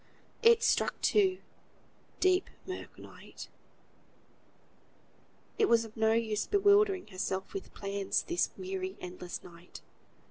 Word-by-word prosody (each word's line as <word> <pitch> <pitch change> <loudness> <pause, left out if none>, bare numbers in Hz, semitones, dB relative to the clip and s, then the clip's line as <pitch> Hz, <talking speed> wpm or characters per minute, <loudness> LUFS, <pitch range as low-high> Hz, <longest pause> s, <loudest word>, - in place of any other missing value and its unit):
It 460 0 +6
struck - - +1
two; 380 -3 +3 0.8
deep, 370 0 +2 0.2
mirk, 370 0 -7
night. - - -12 2.1
It 430 - +4
was 230 -1 +4
of 220 - -13
no 220 0 +3
use 220 -2 0
bewildering 405 -1 +4
herself 190 0 -3
with 390 - -6
plans 200 -1 -1
this 345 0 0
weary, 375 0 -4
endless 180 0 -7
night. 175 0 -13
350 Hz, 110 wpm, -31 LUFS, -, 2.1 s, It